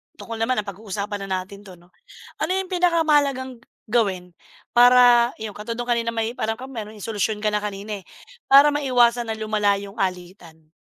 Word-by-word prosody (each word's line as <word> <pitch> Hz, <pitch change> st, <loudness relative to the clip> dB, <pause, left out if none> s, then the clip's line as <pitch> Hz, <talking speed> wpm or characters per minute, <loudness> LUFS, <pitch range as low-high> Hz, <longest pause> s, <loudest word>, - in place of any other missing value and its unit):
tutal 230 Hz, -1 st, -8 dB
naman 225 Hz, +1 st, 0 dB
napag-uusapan 200 Hz, 0 st, -6 dB
natin 195 Hz, +2 st, -5 dB
'to 185 Hz, -, -11 dB
'no, 175 Hz, 0 st, -20 dB, 0.5 s
ano -, -, -1 dB
'yung 380 Hz, 0 st, -4 dB
pinakamahalagang 295 Hz, -8 st, +1 dB, 0.2 s
gawin 195 Hz, -6 st, -1 dB, 0.4 s
para 245 Hz, 0 st, +6 dB
'yung 220 Hz, -1 st, -6 dB
katulad 220 Hz, +3 st, -6 dB
nung 240 Hz, -, -4 dB
kanina 235 Hz, -1 st, 0 dB
may 225 Hz, 0 st, -2 dB
alam 220 Hz, 0 st, -1 dB
ka, 255 Hz, -, -9 dB
pero 220 Hz, -4 st, -6 dB
may 215 Hz, -2 st, -11 dB
solusyon 215 Hz, -1 st, -2 dB
ka 210 Hz, -, +1 dB
na 210 Hz, -, 0 dB
kanina, 205 Hz, 0 st, -5 dB
eh, -, -, -23 dB, 0.4 s
para 280 Hz, +2 st, +7 dB
maiwasan 245 Hz, -5 st, +2 dB
na 220 Hz, -, -3 dB
lumala 215 Hz, -2 st, +1 dB
'yung 200 Hz, 0 st, -8 dB
alitan? 175 Hz, -4 st, -6 dB
220 Hz, 170 wpm, -22 LUFS, 200-245 Hz, 0.5 s, para